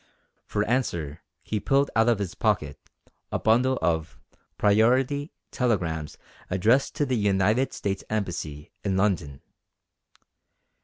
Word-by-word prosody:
For 105 0 0
answer 85 - -1 0.2
he 105 - -2
pulled 140 +6 +2
out 115 +1 +4
of 115 - +3
his 100 -3 -4
pocket - - 0 0.5
a - - 0
bundle 125 +4 +3
of 80 -1 -1 0.4
"priority" 125 +8 +3 0.2
telegrams 85 - -1 0.3
addressed 115 +9 +2
to 145 - +1
the 130 -2 0
United 105 +5 +2
States 100 -1 -3
Embassy 85 -8 -4
in 95 -2 0
London. 90 -9 0
105 Hz, 115 wpm, -26 LUFS, 90-125 Hz, 0.5 s, out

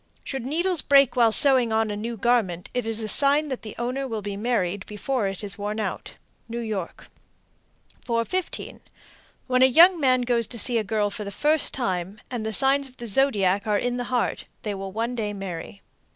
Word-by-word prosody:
Should 265 -3 -5
needles 345 +3 +1
break 275 -2 +4
while 235 -3 +4
sewing 255 -1 +6
on 220 -1 +1
a - - -3
new 230 +3 -5
garment, 210 -6 0
it 245 -2 -2
is 225 0 -1
a - - -3
sign 285 +5 +3
that 260 - -4
the 215 - -9
owner 255 +3 -3
will 220 -4 -5
be 200 0 -4
married 200 -4 -1
before 215 +1 -2
it 195 +2 -6
is 200 -1 -2
worn 210 +2 -3
out. 215 - -5 0.3
New 235 - -5
York. 215 -6 -5 1.0
415. 235 +10 -3 0.7
When 255 -1 +1
a 260 - +8
young 340 +7 +6
man 255 -3 +3
goes 240 -2 0
to 240 - -9
see 235 +1 +2
a - - -2
girl 210 0 -1
for 210 - -6
the 200 - -6
first 300 +9 +2
time, 190 -4 -3
and 240 -3 -3
the 220 - -3
signs 275 +4 +2
of 255 - -20
the 240 - -8
zodiac 205 -5 +2
are 210 -1 +2
in 245 +3 -2
the 245 - -3
heart, 245 -1 -2 0.2
they 210 - -3
will 195 0 -6
one 230 +4 -3
day 215 -4 -3
marry. 195 0 -7
230 Hz, 205 wpm, -24 LUFS, 205-255 Hz, 1.0 s, a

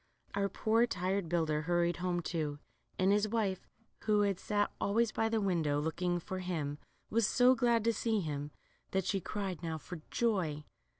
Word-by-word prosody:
Our 200 0 +1
poor 225 +4 +2
tired 185 -3 -1
builder 160 -3 +1
hurried 175 +1 +1
home 180 -1 -1
too, 155 -3 -2 0.4
and 185 +1 +3
his 210 +1 +3
wife, 205 -4 -1 0.4
who 210 -1 +4
had 200 -3 +1
sat 205 0 0
always 225 +2 +2
by 225 +1 0
the 225 0 +1
window 165 -7 +1
looking 175 +3 0
for 185 +2 -5
hini, 155 -5 -3 0.3
was 225 -1 +3
so 250 +3 +5
glad 235 -2 +2
to 230 0 +3
see 225 -1 0
him 145 -4 -3 0.4
that 190 -2 +1
she 195 -2 0
cried 190 -3 -4
now 165 -2 -3
for 165 +1 -8
joy. 180 -11 0
185 Hz, 175 wpm, -33 LUFS, 165-210 Hz, 0.4 s, so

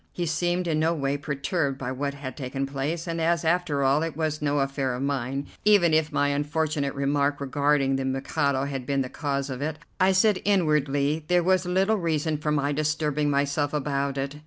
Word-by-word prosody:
He 175 - -2
seemed 175 +3 0
in 155 -2 +1
no 165 +2 +2
way 140 -2 -1
perturbed 140 0 -2
by 130 -1 -4
what 140 +2 -3
had 140 -2 -7
taken 135 0 -3
place, 140 +5 -3
and 165 -1 -3
as, 165 0 +1
after 160 -4 +1
all, 135 +3 +3
it 165 -2 -3
was 155 -2 -1
no 145 0 +1
affair 135 -2 -1
of 125 - -4
mine, 135 0 -2 0.2
even 200 -6 +5
if 155 0 +2
my 145 0 +1
unfortunate 145 0 -1
remark 140 +1 +1
regarding 140 0 +1
the 135 - -2
Mikado 135 +1 0
had 135 -3 -4
been 140 -1 +1
the 130 - -6
cause 140 -2 -2
of 130 +1 -5
it, 155 +1 -2 0.2
I 190 +1 +5
said 190 +1 +3
inwardly 150 -5 +1
there 180 0 +3
was 185 0 +2
little 190 +4 +2
reason 160 -3 -1
for 150 0 -1
my 145 -1 +1
disturbing 150 0 0
myself 145 +1 0
about 140 -1 -1
it. 140 +2 -3
145 Hz, 200 wpm, -26 LUFS, 140-160 Hz, 0.2 s, even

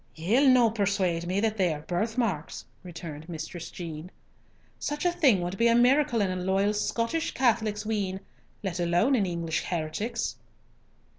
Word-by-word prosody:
"Ye'll 220 - +3
no 245 -3 +5
persuade 190 -5 0
me 185 +2 0
that 220 0 0
they 185 -4 +2
are 150 -1 -4
birth 180 +8 -2
marks," 190 -11 -2 0.2
returned 165 -3 -9
Mistress 165 +1 -6
Jean. 165 -1 -7 0.7
"Such 295 +3 -3
a 355 - +4
thing 280 - +3
would 180 +3 -4
be 230 - +5
a 230 - +4
miracle 245 -1 +4
in 195 -2 +1
a - - -2
loyal 195 +3 +1
Scottish 230 +9 -1
Catholic's 220 -4 +1
wean, 200 -4 -2 0.4
let 185 -3 -3
alone 175 +10 +2
an 210 -7 +2
English 170 -2 -2
heretic's." 170 +7 -3
195 Hz, 160 wpm, -27 LUFS, 175-230 Hz, 0.7 s, no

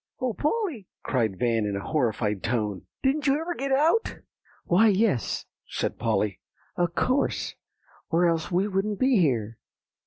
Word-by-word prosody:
"O 255 -2 -1
Polly!" 300 - -1 0.2
cried 110 -7 0
Van 115 -1 +1
in 105 -1 -1
a - - -2
horrified 110 -8 0
tone; 110 -5 -2 0.2
"didn't 280 +2 +1
you 275 +2 +3
ever 340 +2 -3
get 275 -4 -3
out?" 315 +11 +2 0.5
"Why, 195 +6 +5
yes," 200 - +1 0.2
said - - -3
Polly; 105 -4 0 0.4
"of 175 0 0
course, 265 +2 0 0.6
or 175 +1 +3
else 165 -2 +1
we 185 +3 +2
wouldn't 200 +1 -1
be 260 -2 +4
here. 115 - 0
175 Hz, 150 wpm, -26 LUFS, -, 0.6 s, Why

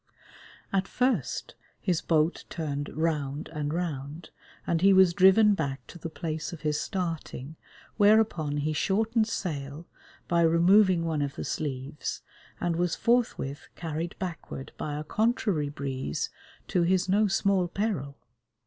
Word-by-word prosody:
At 195 0 +1
first, 250 - -1 0.3
his 175 -3 0
boat 160 +1 +1
turned 145 -3 -3
round 150 -3 -2
and 150 -2 -3
round, 155 -2 -4 0.3
and 165 -1 0
he 195 +1 +6
was 190 -2 +6
driven 200 +3 +6
back 140 -7 -3
to 175 - -12
the 165 - -5
place 155 -1 -4
of 170 - -8
his 150 -1 0
starting, 165 -5 -4 0.4
whereupon 205 -8 +3
he 150 +2 0
shortened 220 +7 +1
sail, 150 -6 -4 0.4
by 170 -1 +2
removing 170 +2 +5
one 160 -3 0
of 140 -1 -2
the - - -5
sleeves, 140 -1 -4 0.4
and 175 -2 0
was 175 -1 +1
forthwith 230 - 0
carried 165 0 -4
backward 170 -6 -6
by 150 -1 -4
a 150 - -4
contrary 205 - 0
breeze, 135 - -3 0.4
to 180 - +2
his 185 +2 +2
no 205 +3 +3
small 195 -2 +2
peril. 175 -8 -2
165 Hz, 140 wpm, -28 LUFS, 150-190 Hz, 0.4 s, he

